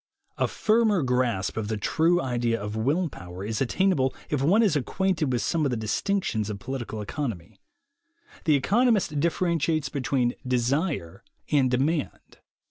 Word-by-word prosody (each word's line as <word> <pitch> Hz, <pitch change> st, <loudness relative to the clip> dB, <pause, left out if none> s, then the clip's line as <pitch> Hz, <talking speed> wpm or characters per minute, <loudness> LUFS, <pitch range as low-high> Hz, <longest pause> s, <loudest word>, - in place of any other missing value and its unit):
A -, -, +2 dB
firmer 215 Hz, -5 st, +2 dB
grasp 125 Hz, -8 st, 0 dB
of 110 Hz, -2 st, -2 dB
the 110 Hz, 0 st, -2 dB
true 165 Hz, +11 st, +2 dB
idea 120 Hz, -5 st, 0 dB
of 105 Hz, +1 st, -5 dB
will 145 Hz, +11 st, +1 dB
power 90 Hz, -, -8 dB
is 110 Hz, +3 st, -3 dB
attainable 135 Hz, 0 st, +1 dB, 0.2 s
if 145 Hz, -3 st, 0 dB
one 195 Hz, +11 st, +4 dB
is 195 Hz, -8 st, +2 dB
acquainted 160 Hz, +1 st, 0 dB
with 120 Hz, -4 st, 0 dB
some 160 Hz, +8 st, 0 dB
of 140 Hz, -, +2 dB
the 125 Hz, -, -1 dB
distinctions 110 Hz, -, -1 dB
of 105 Hz, -, -4 dB
political 120 Hz, -2 st, -5 dB
economy. 105 Hz, -, -5 dB, 0.9 s
The 155 Hz, -3 st, +4 dB
economist 205 Hz, -, +2 dB
differentiates 165 Hz, -1 st, 0 dB
between 125 Hz, -3 st, 0 dB
"desire" 125 Hz, -, -1 dB, 0.3 s
and 135 Hz, -4 st, +3 dB
"demand." 140 Hz, +5 st, -2 dB
135 Hz, 145 wpm, -26 LUFS, 115-165 Hz, 0.9 s, one